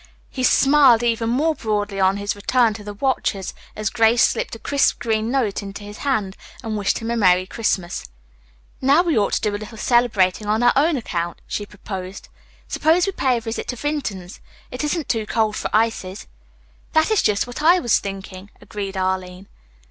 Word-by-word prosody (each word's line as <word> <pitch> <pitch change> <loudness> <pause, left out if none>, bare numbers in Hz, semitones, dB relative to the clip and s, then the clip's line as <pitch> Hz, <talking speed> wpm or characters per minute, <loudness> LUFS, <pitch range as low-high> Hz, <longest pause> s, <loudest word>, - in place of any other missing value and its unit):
He 260 - -5
smiled 270 -2 +5
even 230 -1 0
more 300 +7 +2
broadly 210 -6 -2
on 190 +1 +3
his 205 0 -2
return 230 +2 +2
to 210 0 -9
the 205 0 -7
watchers, 210 -5 -1 0.2
as 215 -1 -2
Grace 225 +1 +4
slipped - - -3
a - - -8
crisp 280 +5 +1
green 225 -2 -1
note 240 -7 0
into 200 +1 -8
his 205 0 -10
hand 215 -9 -1 0.3
and 220 -2 -3
wished 205 -2 0
him 230 0 -4
a - - 0
Merry 185 -4 +3
Christmas. 185 -4 -2 0.7
"Now 280 +6 +4
we 335 -3 0
ought 205 -2 +1
to - - +1
do 210 -1 -1
a 205 - -6
little 220 +1 -9
celebrating 215 -5 +2
on 215 +3 +1
our 245 - +5
own 300 +2 +3
account," 175 -7 -4
she 205 - -4
proposed. 190 -2 -8 0.4
"Suppose 325 +4 +2
we 390 - -1
pay 260 -9 +1
a - - -4
visit 225 0 -5
to 250 - -3
Vinton's. 230 -10 -4 0.3
It 250 +3 -4
isn't 300 +1 -1
too 220 -3 -1
cold 220 -2 0
for - - -3
ices." 215 -3 -1 0.7
"That 315 +6 +3
is 435 - +3
just 200 -1 +1
what 245 +4 -7
I 340 +4 +6
was 240 -10 +2
thinking," 195 -1 -8
agreed 200 -2 -6
Arline. 185 0 -2
220 Hz, 190 wpm, -21 LUFS, 200-255 Hz, 0.7 s, I